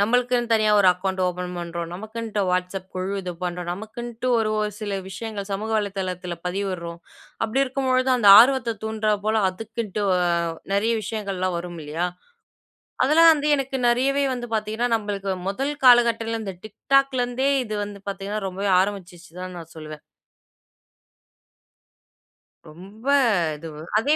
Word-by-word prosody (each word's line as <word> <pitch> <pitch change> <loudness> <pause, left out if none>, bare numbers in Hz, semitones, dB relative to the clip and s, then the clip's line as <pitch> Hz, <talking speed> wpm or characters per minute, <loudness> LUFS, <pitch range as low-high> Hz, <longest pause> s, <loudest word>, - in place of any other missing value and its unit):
நம்மளுக்குன்னு 240 +2 +1
தனியா 215 -1 +3
ஒரு 195 - +5
அக்கவுண்ட் 190 +1 -2
ஓப்பன் 180 0 -4
பண்றோம். 170 -1 -5
நமக்குன்ட்டு 220 +2 -4
WhatsApp 180 +1 -1
குழு 185 +2 -2
இது 180 -1 -4
பண்றோம். 175 0 -4
நமக்குன்ட்டு 235 +5 -6
ஒரு, 215 -1 0
ஒரு 210 0 -1
சில 205 -2 -2
விஷயங்கள் 200 +1 -6
சமூக 215 +3 -3
வலைதளத்தில 185 -3 -3
பதிவிட்றோம். 180 -3 -4 0.4
அப்பிடி 255 +5 +1
இருக்கும்பொழுது 260 0 0
அந்த 210 -5 +4
ஆர்வத்த 245 -3 +3
தூண்டுறா 215 -1 0
போல 220 0 +2
அதுக்குன்ட்டு 215 +1 -5 0.2
அ, - - +1 0.5
நிறைய 215 +4 +2
விஷயங்கள்லாம் 195 -5 -2
வரும் 175 -1 -7
இல்லயா? 165 +4 -2 1.0
அதெல்லாம் 325 +4 +7
வந்து 300 0 -1
எனக்கு 270 0 -3
நிறையவே 270 +4 +2
வந்து 240 -1 -5
பார்த்தீங்கன்னா, 220 +3 -1
நம்மளுக்கு 200 -2 -3 0.2
முதல் 270 +9 -2
காலகட்டத்துல 230 -2 +4
இந்த 195 -3 -5
TikTok 275 +6 +2
லேருந்தே 245 +3 0 0.2
இது 215 -1 -4
வந்து 205 -1 -10
பார்த்தீங்கன்னா, 200 +2 -4
ரொம்பவே 195 +1 -2
ஆரம்பிச்சிச்சு 180 -4 -5
தான் 185 0 -7
நான் 165 0 -12
சொல்லுவேன். 155 -1 -9 2.7
ரொம்ப 195 +8 -14 0.5
இதுவு. 155 -1 -9 0.2
அதே 290 +7 +2
210 Hz, 135 wpm, -23 LUFS, 185-235 Hz, 2.7 s, அதெல்லாம்